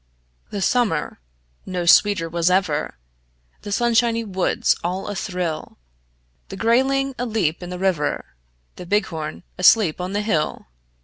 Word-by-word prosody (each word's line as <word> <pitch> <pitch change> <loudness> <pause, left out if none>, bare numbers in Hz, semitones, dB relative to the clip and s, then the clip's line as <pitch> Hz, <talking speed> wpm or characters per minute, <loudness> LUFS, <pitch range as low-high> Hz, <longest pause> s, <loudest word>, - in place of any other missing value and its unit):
The 200 -2 -3
summer 245 - 0 0.4
no 180 -2 -3
sweeter 180 0 +5
was 170 +1 +1
ever; 180 -5 0 0.6
The 205 - -7
sunshiny 230 +1 +2
woods 190 -4 +1
all 180 +3 -3
athrill; 180 -6 -4 0.7
The - - -7
grayling 270 +4 +2
aleap 215 -10 -1
in 175 - -7
the 180 - -5
river, 180 -6 0 0.5
The 180 - -9
bighorn 170 -6 -2 0.2
asleep 180 -2 +4
on 180 +2 -4
the 205 - 0
hill. 160 -8 -1
190 Hz, 125 wpm, -22 LUFS, 170-225 Hz, 0.7 s, sweeter